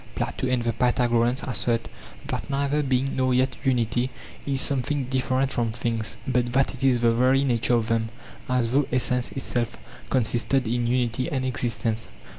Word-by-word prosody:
Plato 130 - -2
and 125 -2 0
the 115 0 0
Pythagoreans 120 0 +2
assert 120 -1 0 0.4
that - - -4
neither 140 +1 0
being 135 -1 0
nor 130 -1 +1
yet 130 +1 +1
unity 125 -1 +1 0.4
is 135 -1 +1
something 140 +1 +1
different 130 +1 0
from 115 -2 0
things, 115 -1 -2
but 125 -2 0
that 135 +1 +2
it 130 - -6
is 125 -3 +3
the 115 -1 +4
very 130 +3 +3
nature 120 -2 +2
of 115 -1 0
them, 115 -1 0 0.4
as 125 -2 +1
though 140 +1 +2
essence 125 0 +1
itself 120 -3 -1 0.3
consisted 125 +1 +1
in 120 +1 0
unity 125 +3 0
and 130 -3 -1
existence. 115 -3 -1
125 Hz, 165 wpm, -25 LUFS, 120-130 Hz, 0.4 s, the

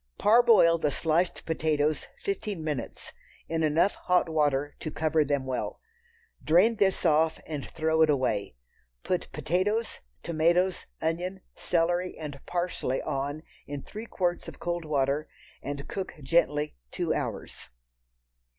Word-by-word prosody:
Parboil 215 -7 +6
the 150 - +1
sliced 165 +4 0
potatoes 155 -2 0
fifteen 210 - -3
minutes 150 -5 -4 0.3
in 165 0 -1
enough 160 +5 +3
hot 180 -1 +1
water 145 -3 +1
to 155 - -4
cover 155 0 +1
them 140 -2 -1
well. 130 -1 -3 0.6
Drain 190 +9 +4
this 190 -3 +2
off 160 0 +3
and 150 -3 -4
throw 160 0 +1
it 160 - +6
away. 110 - 0 0.5
Put - - -2
potatoes, 205 +7 0 0.2
tomatoes, 170 +3 +1 0.2
onion, 180 +4 -2
celery 175 +1 0
and 145 -3 -7
parsley 175 -7 -1
on 145 +1 -3 0.2
in 145 -2 -5
three 220 +2 -8
quarts 175 -4 -1
of - - -9
cold 175 -1 -2
water, 145 0 0 0.3
and 140 0 -5
cook 190 -1 -5
gently 150 0 +2
two - - -1
hours. - - -5
160 Hz, 130 wpm, -28 LUFS, 145-180 Hz, 0.6 s, Parboil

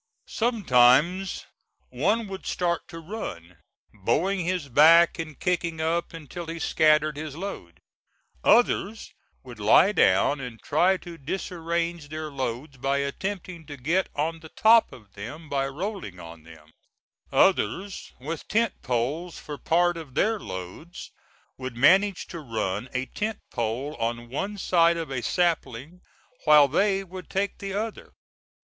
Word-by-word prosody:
Sometimes 180 - +3 0.4
one 205 - 0
would 190 -1 -8
start 170 -2 -1
to 170 - -10
run, 90 - -7 0.4
bowing 150 - 0
his 180 -3 -2
back 165 +7 +6
and 155 -3 -6
kicking 170 -2 -1
up 165 +2 -1
until 165 +1 -8
he 165 +1 -5
scattered 155 -2 +2
his 155 -2 -6
load; 155 - -7 0.6
others 225 -2 +2 0.3
would 125 -4 -11
lie 110 - +5
down 140 - +3
and 125 -4 -7
try 180 +6 +3
to 170 -2 -11
disarrange 170 0 -3
their 155 0 -5
loads 135 +1 -4
by 135 +2 0
attempting 175 +4 -4
to 145 -2 -8
get 165 +9 0
on 160 +3 -1
the 160 -1 -12
top 225 +5 +5
of 105 -7 -15
them 150 +11 -8
by 135 -1 -1
rolling 160 - -5
on 85 -1 -11
them; 80 -2 -16 0.6
others 185 - +1
with 155 +5 -6
tent 225 -1 0
poles 135 +8 -2
for 145 -1 -8
part 175 +1 +2
of 150 -6 -10
their 220 +6 +2
loads 95 - -8 0.5
would 130 -2 -6
manage 190 +8 +4
to 170 - -8
run 110 -4 -3
a 130 +1 -2
tent 215 +9 -3
pole 120 +5 -2
on 120 +1 -3
one 195 +11 -3
side 170 -3 +3
of 160 -4 -5
a 130 -2 -2
sapling 170 -1 -1 0.4
while 150 -2 +7
they 195 +6 +1
would 185 0 -10
take 200 +1 -2
the 195 -1 -5
other. 220 +1 -5
160 Hz, 140 wpm, -26 LUFS, 130-185 Hz, 0.6 s, while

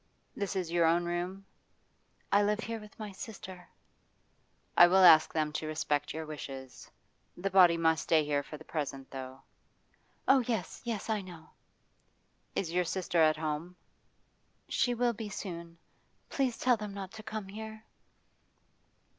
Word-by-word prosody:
'This 200 0 -3
is 180 -3 -2
your 170 0 +3
own 170 +1 +3
room?' 180 +3 -3 0.9
'I 200 - +5
live 210 +1 +1
here 225 +2 -4
with 210 -1 -14
my 215 -2 -6
sister.' 190 -3 -9 1.1
'I 175 - +9
will 190 +2 +5
ask 160 -3 +8
them 155 -1 -1
to 155 0 -3
respect 150 -2 -1
your 160 0 -5
wish. 155 -1 -6
The 135 +7 -9
body 180 -3 +7
must 160 -1 +2
stay 155 -2 +3
here 145 -1 +1
for 150 +2 -9
the 155 - -13
present, 140 -4 -4
though.' 130 0 -8 0.8
'Oh 270 - +6
yes, 220 -8 -2
yes, 230 -5 -3
I 220 -2 0
know.' 175 -4 -12 1.0
'Is 170 -4 -1
your 180 0 +3
sister 175 -1 0
at 155 -1 +4
home?' 155 +3 -3 0.9
'She 245 -2 +1
will 240 0 +2
be 220 -1 -6
soon. 170 -4 -7 0.5
Please 260 -4 0
tell 250 -2 +3
them 210 -2 -6
not 190 -2 -6
to 220 - -9
come 215 -2 -5
here. 220 +1 -8
180 Hz, 155 wpm, -31 LUFS, 160-210 Hz, 1.1 s, I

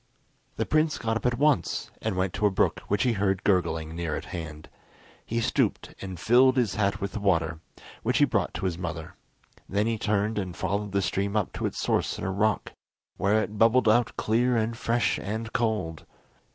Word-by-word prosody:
The - - -1
prince 155 0 +2
got 115 -1 -1
up 115 - 0
at 120 -1 0
once 150 -1 +1
and 110 -3 -1
went 95 -1 0
to 105 - +2
a - - +3
brook 95 - +1
which 105 0 +1
he 125 -2 +2
heard 95 -2 0
gurgling 80 -5 +1
near 85 -2 -2
at - - -5
hand. 75 -3 -6 0.6
He 115 - -2
stooped 115 - 0
and 95 -3 -6
filled 130 +6 +5
his 120 -6 +2
hat 100 -1 0
with 100 -1 -3
the - - -4
water, 85 -5 +1 0.4
which - - +1
he - - +6
brought - - 0
to - - -3
his 90 -2 -2
mother; 85 -3 -5 0.6
then 100 +2 +1
he 115 -1 -1
turned 105 +1 0
and 90 -3 -5
followed 100 0 -2
the 100 0 +1
stream 100 +4 -1
up 105 - -1
to - - -1
its - - -6
source - - 0
in - - -6
a 95 - -1
rock, 105 +1 0 0.5
where 105 +2 +2
it 105 0 -7
bubbled 115 +2 +5
out 115 +2 +3
clear 120 +3 +2
and 115 +1 0
fresh 115 +1 0
and 110 +3 -4
cold. 105 -9 -1
105 Hz, 205 wpm, -27 LUFS, 95-115 Hz, 0.6 s, he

